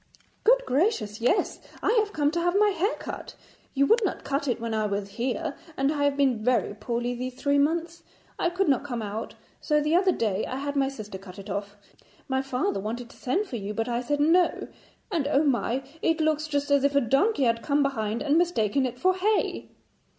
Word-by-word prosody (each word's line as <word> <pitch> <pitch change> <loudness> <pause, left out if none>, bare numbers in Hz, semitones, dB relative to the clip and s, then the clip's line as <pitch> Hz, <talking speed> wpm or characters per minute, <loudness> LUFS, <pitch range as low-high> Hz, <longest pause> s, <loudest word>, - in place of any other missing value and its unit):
'Good - - +4
gracious, 250 - 0
yes, 250 - +1 0.2
I - - +3
have 420 -1 0
come 295 -4 +1
to 340 +1 -1
have 350 +2 +1
my 420 0 +5
hair 395 +3 0
cut. - - -7 0.4
You 275 +1 +4
would 455 +8 +4
not 385 - -2
cut 280 +1 -2
it 245 -2 0
when 230 -1 -3
I 215 -1 +1
was 200 0 -3
here, 260 +8 -2 0.2
and 275 +2 +2
I 290 -2 0
have 285 -1 +1
been 260 -6 +2
very 245 -3 +1
poorly 235 +3 -2
these 250 +1 -5
three 285 +2 +1
months. 335 +3 0 0.4
I 345 - +2
could 375 +2 0
not 275 -2 +2
come 245 -5 -4
out, 210 +2 -5 0.2
so 300 -1 +2
the 300 +2 +1
other 375 +1 +4
day 215 - 0
I - - -4
had 285 +2 -3
my 275 -1 +2
sister 210 -7 -8
cut 190 0 -12
it 200 0 -8
off. 200 +1 -4 0.5
My 265 0 0
father 270 - -1
wanted 235 +4 -5
to - - -16
send 320 +12 0
for 255 - -5
you, 205 0 -5
but 225 +1 -1
I 240 0 -1
said 290 +3 -1
"no," 335 +4 +3 0.4
and, 320 -7 0
oh, 290 0 +3
my! 265 -2 0 0.2
it 325 0 +1
looks 310 -1 +1
just 285 -1 -1
as 280 -1 +4
if 280 0 +2
a 280 - +5
donkey 275 - +2
had 230 -1 +2
come 285 +2 +2
behind 225 -5 -1
and 300 +2 +3
mistaken 275 - +1
it 250 0 -7
for 370 +7 +3
hay.' 405 +3 0
275 Hz, 220 wpm, -26 LUFS, 235-320 Hz, 0.5 s, my